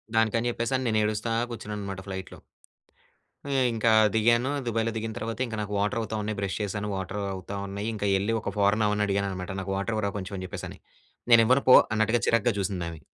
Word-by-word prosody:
దానికని 115 +2 +2
చెప్పేసి 115 +2 -2
అని, 130 - -4
నేను 110 -1 +2
ఏడుస్తా 105 +2 -1 0.2
కూర్చున్నా 105 -2 -6
అన్నమాట 100 -2 -5
ఫ్లై‌ట్‌లో. 95 -1 -7 1.1
ఏహ్, 130 -1 +3
ఇంకా 115 0 +2 0.2
దిగాను. 120 +4 +3 0.2
దుబాయ్‌లో 115 0 0
దిగిన 110 0 -3
తర్వాత 115 +1 -4
ఇంకా 115 -2 -5
నాకు 105 0 -4
వాటర్ 105 +4 0
అవుతా 110 0 -4
ఉన్నాయి. 105 0 -3
బ్రష్ 100 -1 -2
చేశాను. 105 0 -3
వాటర్ 95 +2 -4
అవుతా 95 +1 -6
ఉన్నాయి, 100 +2 -4
ఇంకా 105 -1 -2
వెళ్లి 100 +4 0
ఒక - - -4
ఫా‌రన్ 105 +2 +3
ఆమని 105 0 +1
అడిగాను 100 0 0
అన్నమాట. 90 -1 -5
నాకు 95 0 -3
వాటర్ 105 +3 -2
ఇవ్వరా! 100 -2 -1
కొంచెం 95 +1 -6
అని 95 - -5
చెప్పేసి - - -6
అని. - - -12 0.5
'నేను 115 -1 +8
ఇవ్వను 130 +3 +4
పో!" 125 - +10 0.2
అన్నట్టుగా 110 +2 +2
చిరాగ్గా 115 +1 +3
చూసింది 95 -3 -2
ఆమె. 80 -2 -9
105 Hz, 205 wpm, -27 LUFS, 100-115 Hz, 1.1 s, పో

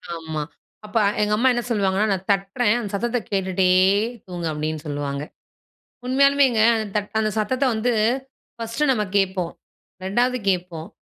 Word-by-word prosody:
ஆமா. 160 -2 -4 0.4
அப்ப 210 +2 -3 0.2
எங்க 210 0 +1
அம்மா 260 +3 +4
என்ன 240 0 -1
சொல்லுவாங்கன்னா, 200 -1 +1
நான் 190 0 -5
தட்றேன் 200 +3 +1
அந்த 210 -4 -5
சத்தத்த 240 +4 0
கேட்டுட்டே 190 -1 +1 0.6
தூங்கு 175 -2 -4
அப்பிடின்னு 155 0 -3
சொல்வாங்க. 145 -1 -3 0.8
உண்மையாலுமேங்க 270 -3 +4
அந்த 220 -1 -2
தட் 205 -1 -2
அந்த 215 -1 +1
சத்தத்த 255 +6 0
வந்து 240 +3 0 0.6
ஃபர்ஸ்ட்டு 230 +5 -1
நம்ம 215 -4 0
கேட்போம். 190 -3 0 0.5
2வது 245 +6 +1
கேட்போம், 175 -3 -3
205 Hz, 135 wpm, -22 LUFS, 180-240 Hz, 0.8 s, அம்மா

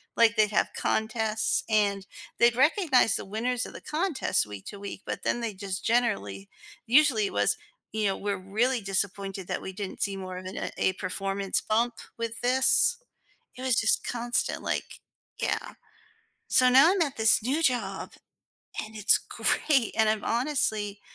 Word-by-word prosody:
like, 230 -2 +4
they'd 215 -1 +3
have 210 - +1
contests 220 0 0
and 200 -2 +1 0.3
they'd 235 0 +5
recognize 270 - +3
the - - -3
winners 240 +5 -2
of - - -10
the - - -10
contest 310 - 0
week 100 -2 -9
to 200 - -8
week, 200 0 -7
but - - -4
then 240 - 0
they 225 -3 -3
just 190 -1 -6
generally 100 - 0 0.4
usually 250 -5 +4
it - - -8
was, - - +2 0.3
you 215 -1 -1
know, 195 - -1
we're 200 -1 -2
really 230 +6 0
disappointed 195 -1 -3
that - - -3
we 190 - -6
didn't 195 0 -7
see 195 -1 -1
more 185 -1 -6
of 185 - -12
an 185 - -5
a 190 - +2
performance 195 +1 -2
bump 230 +2 +1 0.2
with 230 0 -4
this. 265 - +3 0.6
It - - -8
was 255 -3 +3
just 220 - +1
constant, 240 0 -1
like, - - -3 0.4
yeah. - - -2 0.8
So 255 0 +5
now 275 +7 +7
I'm 385 -4 +2
at 285 -4 -2
this 220 -1 +4
new 280 +7 0
job, 230 -9 -1 0.7
and 215 - -12
it's 210 - +4
great, 270 -7 0
and 220 -1 +4
I'm 215 -1 -2
honestly 220 -5 -1
220 Hz, 165 wpm, -27 LUFS, 195-250 Hz, 0.8 s, now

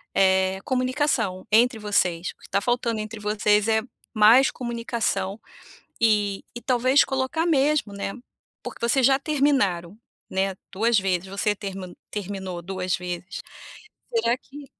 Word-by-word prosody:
é 190 0 +3
comunicação 255 -7 0
entre 235 +2 +4
vocês, 180 -5 0
o - - -59
que - - -17
está 200 - 0
faltando 240 -1 0
entre 215 +1 -7
vocês 210 0 +2
é 220 0 +3 0.3
mais 225 +5 +6
comunicação 230 -4 -2 0.6
e 210 -3 +2
e 240 - -6
talvez 255 +2 +3
colocar 265 +5 -1
mesmo, 290 -7 +2
né, 200 0 -4 0.5
porque 235 - -4
vocês 255 +1 +3
já 270 0 +4
terminaram, 260 - +1 0.3
né 190 0 -1 0.2
2 220 +3 +2
vezes, 190 -1 0
você 200 +2 -1
termi 190 -3 -7
terminou 190 -3 -5
2 185 0 -3
vezes. 180 +1 -6 0.7
Será 250 - +2
que 285 +2 -12
210 Hz, 135 wpm, -24 LUFS, 190-250 Hz, 0.7 s, mais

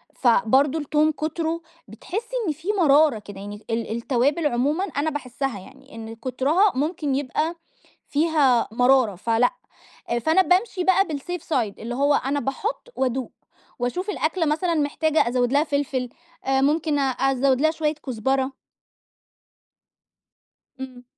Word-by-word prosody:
فبرضه 265 +5 +3
التوم 305 +1 +2
كتره 320 +2 -3 0.3
بتحسّي 410 - -6
إن 310 - +1
في 320 +5 -14
مرارة 295 -5 +5
كده 205 -2 -11
يعني، 205 +1 -9
ال 230 -1 -2
التوابل 275 +6 +1
عمومًا 290 +7 0
أنا 315 -5 -1
باحسّها 270 -5 -4
يعني 270 +7 -15
إن 225 0 -8
كترها 280 - +2
ممكن 295 0 -1
يبقى 290 +5 -1 0.5
فيها 290 -6 +2
مرارة، 245 -2 +3
فلأ، 230 +6 +1 0.7
فأنا 320 +9 +4
بامشي 370 +1 +1
بقى 380 +2 +4
بالSafe 325 +2 -5
side 235 -10 -1
اللي 235 +2 -5
هو 285 +2 +3
أنا 280 +1 0
باحطّ 390 - -3
وأدوق 260 -1 -1 0.5
وأشوف 355 - -2
الأكلة 330 -3 0
مثلًا 320 +3 0
محتاجة 310 0 +1
أزود 245 +1 0
لها 290 +1 +4
فلفل، 280 -4 -2 0.4
ممكن 290 +3 +2
أزوّد 270 0 +1
لها 315 +1 +4
شوية 310 -1 -1
كزبرة. 265 +3 0 2.3
امم. 255 -2 -8
280 Hz, 130 wpm, -23 LUFS, 250-315 Hz, 2.3 s, مرارة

